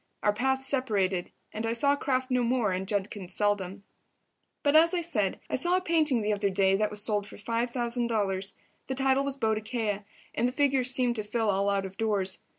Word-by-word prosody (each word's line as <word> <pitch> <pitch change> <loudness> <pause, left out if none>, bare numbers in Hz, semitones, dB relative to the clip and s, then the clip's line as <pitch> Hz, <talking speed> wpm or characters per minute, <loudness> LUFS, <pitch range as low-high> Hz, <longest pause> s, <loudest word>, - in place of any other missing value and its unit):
Our 210 - +3
paths 265 +4 0
separated, 205 -10 +1 0.2
and 220 - -4
I 225 0 0
saw 280 +4 +3
Kraft 260 -2 -1
no 250 -1 +3
more 235 -4 +1
and 185 +1 -2
Judkins 195 -2 -2
seldom. 200 -2 -1 0.8
But, 290 +1 +3
as 335 +3 +6
I 350 - +1
said, 215 - -1
I - - -1
saw 350 +7 +2
a - - -1
painting 310 - +2
the 210 0 +1
other 200 -1 0
day 190 0 +3
that 210 +1 +1
was 210 -1 -3
sold 205 -2 0
for - - -11
$5,000. 230 -4 -1 0.3
The 265 - -2
title 270 0 +2
was 280 -1 -3
"Boadicea," 220 -2 -1 0.3
and 240 - +1
the - - -1
figure 275 -2 +2
seemed 245 -1 +1
to 215 - -2
fill 220 0 0
all 200 +1 +1
out 200 -1 0
of 190 +1 -9
doors. 200 -4 -1
225 Hz, 200 wpm, -28 LUFS, 200-260 Hz, 0.8 s, as